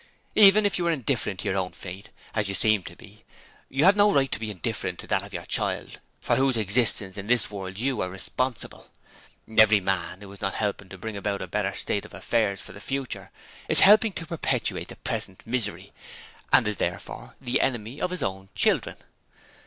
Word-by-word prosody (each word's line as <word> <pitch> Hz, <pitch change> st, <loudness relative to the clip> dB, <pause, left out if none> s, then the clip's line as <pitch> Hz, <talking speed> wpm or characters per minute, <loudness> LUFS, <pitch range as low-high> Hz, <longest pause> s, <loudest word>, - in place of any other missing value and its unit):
Even 210 Hz, 0 st, +7 dB
if 190 Hz, -3 st, +1 dB
you 170 Hz, -, 0 dB
are -, -, +3 dB
indifferent 125 Hz, -, -2 dB
to -, -, -4 dB
your 95 Hz, -, 0 dB
own 90 Hz, -1 st, -3 dB
fate 95 Hz, +2 st, -8 dB, 0.2 s
as 105 Hz, -3 st, 0 dB
you 100 Hz, -, -2 dB
seem 110 Hz, -1 st, +3 dB
to 90 Hz, -, -10 dB
be 110 Hz, -2 st, -16 dB, 0.5 s
you 140 Hz, +2 st, +1 dB
have 195 Hz, +2 st, +7 dB
no 205 Hz, 0 st, +5 dB
right 135 Hz, -1 st, +2 dB
to -, -, 0 dB
be 110 Hz, -1 st, -4 dB
indifferent 95 Hz, -6 st, -3 dB
to -, -, -9 dB
that -, -, +1 dB
of -, -, -10 dB
the -, -, -6 dB
child -, -, -2 dB, 0.2 s
for -, -, +1 dB
whose 135 Hz, -2 st, +2 dB
existence 105 Hz, -2 st, +1 dB
in 100 Hz, 0 st, -6 dB
this 120 Hz, -2 st, +3 dB
world 95 Hz, -2 st, -6 dB
you 125 Hz, +1 st, -1 dB
are 90 Hz, -, -2 dB
responsible. 120 Hz, +7 st, -4 dB, 0.7 s
Every 110 Hz, -1 st, +7 dB
man 95 Hz, -1 st, -2 dB
who 100 Hz, -1 st, -10 dB
is 100 Hz, -, -12 dB
not 95 Hz, -1 st, -1 dB
helping 100 Hz, -2 st, -2 dB
to 95 Hz, -, -10 dB
bring 110 Hz, +3 st, -6 dB
about 100 Hz, -1 st, -2 dB
a -, -, -6 dB
better 100 Hz, +1 st, -2 dB
state 100 Hz, -, 0 dB
of -, -, -12 dB
affairs 105 Hz, -4 st, 0 dB
for -, -, -11 dB
the 100 Hz, -, -11 dB
future 135 Hz, +2 st, -4 dB, 0.4 s
is -, -, +7 dB
helping 210 Hz, +1 st, +7 dB
to 165 Hz, -, -5 dB
perpetuate 170 Hz, -2 st, -1 dB
the -, -, -9 dB
present 95 Hz, -, -4 dB
misery, 115 Hz, -3 st, -2 dB, 0.6 s
and 115 Hz, -, +5 dB
is 105 Hz, -2 st, -2 dB
therefore -, -, -4 dB
the 125 Hz, -1 st, 0 dB
enemy 120 Hz, +1 st, -2 dB
of -, -, 0 dB
his 180 Hz, 0 st, -3 dB
own 95 Hz, 0 st, -4 dB
children. -, -, +2 dB
110 Hz, 205 wpm, -26 LUFS, 100-135 Hz, 0.7 s, Even